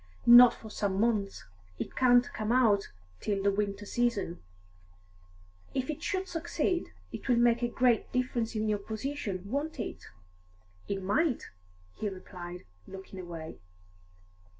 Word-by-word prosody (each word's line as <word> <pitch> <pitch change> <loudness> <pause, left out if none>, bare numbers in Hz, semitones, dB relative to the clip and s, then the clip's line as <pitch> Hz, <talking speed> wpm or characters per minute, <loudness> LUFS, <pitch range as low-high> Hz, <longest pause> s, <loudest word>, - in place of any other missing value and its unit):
"Not 240 0 +9
for 220 - -11
some 200 -2 -1
months. 210 -3 0 0.3
It - - -5
can't 245 -1 +5
come 215 +1 -2
out 225 -6 +3 0.3
till 200 -2 -1
the 200 - +4
winter 205 0 -2
season." 210 -6 -1 1.3
"If 260 +3 0
it 295 - -8
should 380 -1 -2
succeed, 340 +1 -1 0.2
it - - -7
will 245 - +5
make 235 0 +3
a 240 - +2
great 240 -1 +2
difference 245 -2 -1
in 215 0 0
your 210 -1 +1
position, 220 -3 -4
won't 290 +2 -2
it?" 225 - -5 0.8
"It 195 -1 -3
might," 250 - +1 0.5
he 210 - -2
replied, 180 -2 -9 0.2
looking 190 0 -9
away. 170 -3 -8
220 Hz, 135 wpm, -30 LUFS, 200-250 Hz, 1.3 s, Not